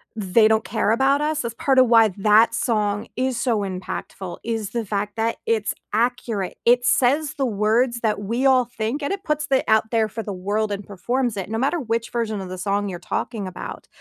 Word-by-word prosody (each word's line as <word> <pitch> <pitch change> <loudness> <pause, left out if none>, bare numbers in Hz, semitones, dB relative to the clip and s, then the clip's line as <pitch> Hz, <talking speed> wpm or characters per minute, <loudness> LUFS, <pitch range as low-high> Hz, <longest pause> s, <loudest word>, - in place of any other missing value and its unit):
"They 215 +1 +3
don't 220 0 +2
care 220 -2 0
about 270 +5 +3
us." 305 0 0
That's 235 -1 -5
part 265 +1 +2
of 255 - +6
why 225 -2 +6
that 215 +3 +5
song 210 -3 0
is 255 -1 -1
so 235 -5 +1
impactful, 185 -1 -5
is 225 -3 -3
the 235 -2 -2
fact 205 +1 -3
that 225 +1 -1
it's 220 -2 0 0.2
accurate. 230 -4 -1
It 245 +1 +4
says 290 +4 +2
the 270 - 0
words 235 +3 +1
that 215 -2 0
we 235 +6 -1
all 255 -2 +5
think, 235 +4 -3
and - - -1
it 395 - -6
puts 300 -1 -1
it 265 - +3
out 220 0 +3
there 225 -2 +2
for 225 +2 -6
the 200 - -5
world 205 +3 -1
and 200 0 -4
performs 240 +4 -2
it, 190 +1 -4
no 225 - -2
matter 280 +7 0
which 230 -2 -2
version 220 -4 -2
of 185 - -7
the 185 - -6
song 200 +2 -1
you're 175 -2 -6
talking 200 +2 -3
about, 185 - -8
225 Hz, 215 wpm, -22 LUFS, 205-245 Hz, 0.2 s, of